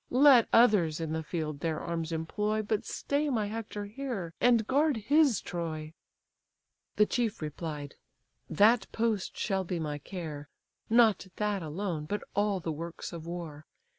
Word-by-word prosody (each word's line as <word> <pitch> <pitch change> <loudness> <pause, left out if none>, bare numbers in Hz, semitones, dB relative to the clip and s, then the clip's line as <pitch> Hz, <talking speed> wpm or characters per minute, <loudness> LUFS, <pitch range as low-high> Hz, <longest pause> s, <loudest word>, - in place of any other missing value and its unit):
Let 260 -2 +6
others 200 -10 +4
in 160 -1 -3
the 160 - -1
field 155 -2 -4
their 160 0 -1
arms 165 -1 -3
employ, 210 +7 -1
But 215 0 -1
stay 290 +1 -1
my 225 -6 0
Hector 210 -1 -5
here, 210 -6 -5
and 235 -3 +4
guard 285 +2 +2
his 280 - +3
Troy." 160 -2 -5 1.0
The 210 - +5
chief 225 -1 -1
replied: 150 -2 -5 0.6
"That 205 +5 +4
post 220 -4 -1
shall 195 -2 0
be 175 -1 -3
my 150 -2 -3
care, 150 -3 -7 0.4
Not 225 -4 +4
that 210 -2 -1
alone, 160 0 -3
but 205 +6 -3
all 205 -1 +1
the 165 -2 -3
works 165 +3 -6
of 165 -1 -7
war. 165 -4 -7
195 Hz, 150 wpm, -30 LUFS, 160-220 Hz, 1.0 s, Let